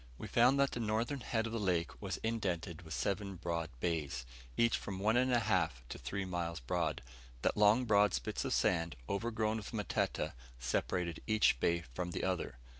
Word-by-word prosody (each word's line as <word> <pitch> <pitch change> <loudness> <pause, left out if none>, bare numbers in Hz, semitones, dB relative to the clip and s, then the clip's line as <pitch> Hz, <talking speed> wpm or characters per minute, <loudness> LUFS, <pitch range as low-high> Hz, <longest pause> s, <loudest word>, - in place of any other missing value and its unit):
We - - -6
found 125 +4 +4
that 140 0 +4
the - - -4
northern 115 +5 0
head 115 -2 -1
of 115 - -4
the 115 - -1
lake 90 -5 0
was 95 -4 -3
indented 95 -7 -2
with 80 -3 -6
seven 100 - -1
broad 85 -2 -2
bays, 75 -5 -1 0.3
each 115 0 +4
from 95 - -4
one 105 +4 +2
and 130 +1 +3
a 120 -1 +4
half 60 - +1
to - - -6
three 100 -1 -3
miles 85 -2 -2
broad; 80 +3 -1 0.4
that - - +2
long 105 +4 +5
broad 105 -3 +4
spits - - -2
of - - -2
sand, 85 -4 +2
overgrown 110 +1 0
with 105 +1 -7
matete, 105 -5 -1 0.3
separated 80 +7 -1
each 110 - +4
bay 85 +4 +2
from 90 +4 -3
the - - -2
other. 90 -9 -1
95 Hz, 190 wpm, -35 LUFS, 85-110 Hz, 0.4 s, long